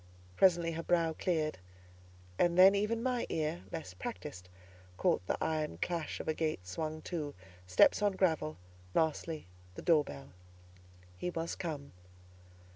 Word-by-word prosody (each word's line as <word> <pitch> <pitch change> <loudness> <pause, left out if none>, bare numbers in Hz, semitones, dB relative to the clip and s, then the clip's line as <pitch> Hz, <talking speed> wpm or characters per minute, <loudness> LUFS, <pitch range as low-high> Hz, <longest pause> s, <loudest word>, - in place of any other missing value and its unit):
Presently 170 - +4
her 165 0 -3
brow 165 -1 +2
cleared; 155 - -1 0.8
and 175 0 +3
then 190 +2 +9
even 210 +3 0
my 250 -2 0
ear, 150 - -1
less 90 - -5
practised, 90 0 -7 0.5
caught - - +2
the - - 0
iron 155 - -1
clash 170 - -2
of - - -6
a 155 - +2
gate 155 - -2
swung 155 - -4
to, 155 -5 -4 0.3
steps 90 - +5
on 205 -1 +3
gravel, 160 - +1 0.4
lastly 160 0 0 0.3
the - - -8
door 160 -3 +5
bell. 70 - -9 0.9
He 180 - -1
was 165 -1 -3
come. 150 -5 -5
160 Hz, 140 wpm, -33 LUFS, 150-175 Hz, 0.9 s, then